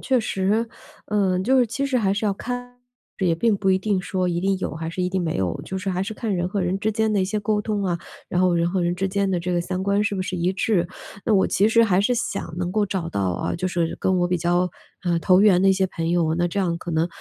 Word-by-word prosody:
确 260 -2 +2
实， 215 +3 0 0.4
呃， 195 -3 +1
就 260 +7 +3
是 245 - +4
其 275 +5 -2
实 265 -2 +1
还 195 -3 +1
是 205 +2 -2
要 205 - +2
看， 245 +3 -6 0.4
也 175 -4 +2
并 215 +4 +2
不 195 -1 -1
一 190 - +5
定 200 -1 0
说 185 -1 -1
一 170 -1 -1
定 195 +1 +1
有 - - -3
还 160 0 -4
是 175 +2 -3
一 180 - +1
定 190 0 -1
没 165 -2 -2
有， 90 -3 -1
就 190 - -5
是 190 +1 -2
还 185 0 -1
是 220 - -5
看 220 -2 -3
人 175 +1 -1
和 200 0 -2
人 180 +2 0
之 220 +2 0
间 220 0 +1
的 200 - +2
一 - - +2
些 210 +2 -2
沟 210 0 0
通 210 -2 -2
啊， 175 -2 0 0.3
然 180 - 0
后 185 -1 +3
人 170 0 +1
和 190 -1 0
人 175 0 +1
之 190 +2 -1
间 200 +1 0
的 180 -2 0
这 180 +1 -2
个 175 - +1
三 185 +2 -3
观 200 +1 +1
是 205 - 0
不 185 - -1
是 185 0 -4
一 175 +2 +1
致。 190 -2 +1 0.4
那 220 - +3
我 190 - +4
其 205 +3 +3
实 230 +1 +5
还 195 -4 +3
是 245 +5 +2
想 200 -7 -3
能 180 0 -2
够 205 +1 +1
找 185 -3 -3
到 100 - -3
啊， - - -2
就 185 - -2
是 170 -2 -1
跟 185 -1 +1
我 175 - +1
比 180 - +1
较， 175 +1 +1 0.3
呃， 175 -2 +1
投 185 +2 +4
缘 200 -3 +5
的 195 - +4
一 - - +6
些 190 0 +1
朋 165 -2 -3
友， 165 -2 +2
那 175 0 +2
这 200 - -3
样 170 -3 0
可 175 - -6
能， 160 +1 +2
190 Hz, 315 characters per minute, -23 LUFS, 175-210 Hz, 0.4 s, 一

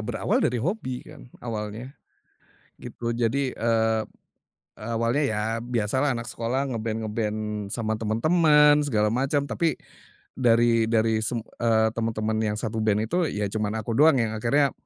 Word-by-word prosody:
berawal - - -1
dari 125 - +1
hobi 130 - -3
kan, - - -13 0.2
awalnya, 110 +3 -5 0.9
gitu. 120 0 -4
Jadi, 125 +3 0
eee, 110 -1 +1 0.7
awalnya, 115 +5 -1
ya 110 -5 0 0.2
biasa 120 +1 -1
lah 145 - +2
anak 115 0 -6
sekolah 130 +4 -2
nge-band-nge-band 110 -2 -3
sama 110 -2 -1
teman-teman, 150 +6 +4
segala 110 -7 +1
macam, 140 +3 0
tapi, 160 +6 0 0.6
dari 115 -2 +3
dari 110 -1 +2 0.7
teman-teman 110 -1 -1
yang 105 -1 -1
satu 110 0 -3
band 110 0 +1
itu, 175 +8 0
ya 105 0 -2
cuman 105 0 -1
aku 115 - -3
doang 150 +1 +5
yang 115 -3 0
akhirnya, 135 +5 +2
115 Hz, 135 wpm, -25 LUFS, 110-130 Hz, 0.9 s, doang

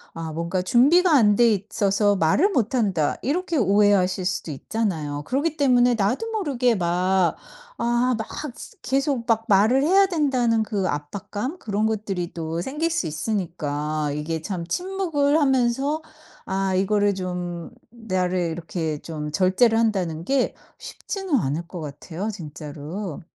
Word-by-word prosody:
아 165 -1 -5
뭔가 170 +3 -2
준비가 310 - +4
안 210 -5 +5
돼 235 -1 +5
있어서 205 0 +1
말을 190 - +3
못 245 -2 0
한다. 195 - +1
이렇게 330 +3 -1
오해하실 200 -3 +3
수도 180 -2 -2
있잖아요. 150 -3 -3
그러기 290 +4 0
때문에 250 -3 +4
나도 240 - 0
모르게 270 - +1
막 180 0 +1 0.4
아 240 +1 +2
막 220 - -4 0.6
계속 270 -2 -1
막 225 -1 +2
말을 220 +7 +4
해야 385 +5 +5
된다는 255 - +1
그 200 -3 -1
압박감 205 - -4
그런 210 0 -1
것들이 200 -5 -2
또 165 0 -4
생길 300 - -2
수 330 - -1
있으니까 155 -4 -2
이게 160 +1 -3
참 175 -2 -4
침묵을 325 - 0
하면서 270 +2 +1 0.4
아 190 0 -1
이거를 205 +2 +2
좀 180 -2 -4 0.2
나를 185 -6 -1
이렇게 165 -2 -3
좀 150 -2 -5
절제를 200 +6 +3
한다는 185 -8 0
게 270 +4 +1 0.2
쉽지는 385 -7 -4
않을 165 - -1
것 175 0 -7
같아요, 165 +7 -5
진짜로. 155 +2 -7
205 Hz, 280 characters per minute, -23 LUFS, 170-250 Hz, 0.6 s, 안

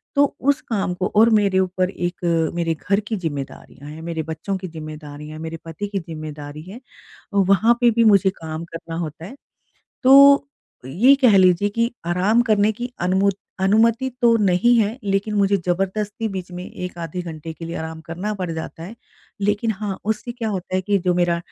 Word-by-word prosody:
तो 285 0 +5
उस 280 +1 +1
काम 195 -5 -2
को 185 +1 -2
और 225 +2 +6
मेरे 200 -3 +3
ऊपर 185 0 0
एक 175 -2 -4 0.4
मेरे 170 -1 0 0.2
घर 200 +1 +4
की 215 +1 -4
ज़िम्मेदारियाँ 145 -3 -6
हैं, 155 +2 -9
मेरे 165 -1 -4
बच्चों 160 +5 -4
की 185 - -7
ज़िम्मेदारियाँ, 155 -1 -9
मेरे 165 0 -6
पति 165 +6 -5
की 200 -1 -3
ज़िम्मेदारी 155 -2 -8
है, 235 - -9 0.5
वहाँ 200 +4 +4
पे 240 - +5
भी 230 +1 +2
मुझे 195 -3 +5
काम 160 0 -5
करना 165 0 -7
होता 160 0 -6
है। 235 - -10 0.7
तो 280 +1 +7 0.4
ये 235 - +5
कह 225 -6 +6
लीजिए 185 +2 +4
कि 230 +3 0 0.2
आराम 190 +7 +2
करने 210 -1 +3
की 240 +3 -6
अनुमुत 190 +2 +2 0.2
अनुमति 230 +6 +3
तो 235 -1 +5
नहीं 205 +3 +3
है 220 +3 0
लेकिन 200 +2 -1
मुझे 200 0 +3
ज़बरदस्ती 195 +5 -2
बीच 185 -3 -6
में 180 +1 -6
1 180 -1 -7
आधे 170 +1 -5
घंटे 160 -1 -7
के 165 - -9
लिए 165 +1 -5
आराम 160 0 -6
करना 180 +6 -4
पड़ 185 -3 -4
जाता 160 0 -7
है। 200 +7 -8 0.5
लेकिन 205 +3 0
हाँ, 200 -2 -5
उससे 220 +3 -2
क्या 235 -2 -4
होता 185 -2 -4
है - - +1
कि 200 +1 +1
जो 180 -1 0
मेरा 175 -1 +1
190 Hz, 185 wpm, -21 LUFS, 165-215 Hz, 0.7 s, तो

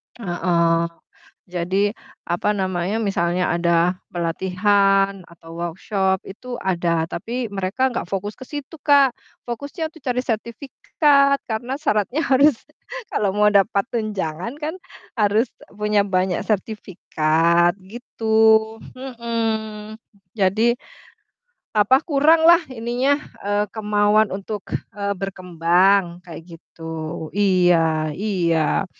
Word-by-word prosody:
Heeh, 170 -4 +1 0.6
jadi 185 +3 -1 0.3
apa 175 +4 -1
namanya, 185 +1 -1
misalnya 180 -4 0
ada 170 +1 +1
pelatihan 195 +3 +1
atau 165 -1 -14
workshop 190 +2 -1
itu 245 +5 -8
ada, 170 -5 0
tapi 230 +7 -5
mereka 200 +7 -1
nggak 205 - -4
fokus 200 +2 -3
ke 260 - -12
situ 295 +1 -8
Kak. 280 -3 +4 0.3
Fokusnya 285 +6 -5
tuh 320 - -16
cari 250 -1 -2
sertifikat 280 +4 +1
karena 240 +4 -3
syaratnya 260 - 0
harus 275 0 +4 0.6
kalau 200 -1 0
mau 210 0 +4
dapat 200 0 +3
tunjangan 210 - -3
kan 305 +2 -4 0.5
harus 210 +3 +3 0.2
e - - -22
punya 210 0 +1
banyak 185 -2 0
sertifikat 175 -5 +1 0.2
gitu. 220 -2 +2 0.2
Mhm, 225 -4 -4 0.3
jadi 215 +3 +2 1.0
apa, 255 +7 +4
kuranglah 320 +3 +5
ininya, 250 +3 0 0.2
eee, 205 +1 0
kemauan 210 0 +2
untuk, 205 +1 -5 0.3
eee, 200 0 -2
berkembang 180 0 +1
kayak 170 -2 -10 0.2
gitu. 165 - -17 0.5
Iya 175 -5 +2
iya, 175 -4 +1
205 Hz, 105 wpm, -21 LUFS, 180-235 Hz, 1.0 s, kuranglah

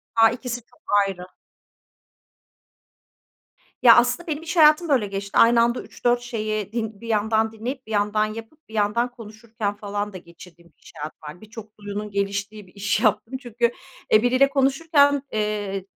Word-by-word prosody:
A, 225 -1 +6
ikisi 245 0 -5
çok - - -27 0.3
ayrı. 180 -2 -7 2.6
Ya, 235 -2 +9
aslında 245 +9 +2
benim 310 0 -3
iş 335 +2 -5
hayatım 310 +1 +6
böyle 250 -8 +2
geçti. 200 0 -4
Aynı 230 0 +6
anda 235 +1 +1
3-4 240 0 -1
şeyi 215 -4 -3
din 220 -3 -4
bir 230 - -9
yandan 220 0 +1
dinleyip 245 +3 -6
bir - - -9
yandan 210 +1 +1
yapıp 225 +8 -10
bir 220 - -14
yandan 220 +4 0
konuşurken 220 -2 -6
falan 205 0 -4
da 185 - -6
geçirdiğim 170 0 -16
bir - - -29
iş - - -14
hayatım 150 +1 -7
vardı. 155 +5 -10
Birçok 215 0 -12
duyunun 205 0 -6
geliştiği 200 +1 -3
bir - - -21
iş 200 0 -1
yaptım 220 +3 0
çünkü, 235 -1 0 0.4
e, 215 - +6
biriyle 255 +3 +4
konuşurken, 285 +1 +3
eee, 205 -3 -2
220 Hz, 160 wpm, -23 LUFS, 205-245 Hz, 2.6 s, Ya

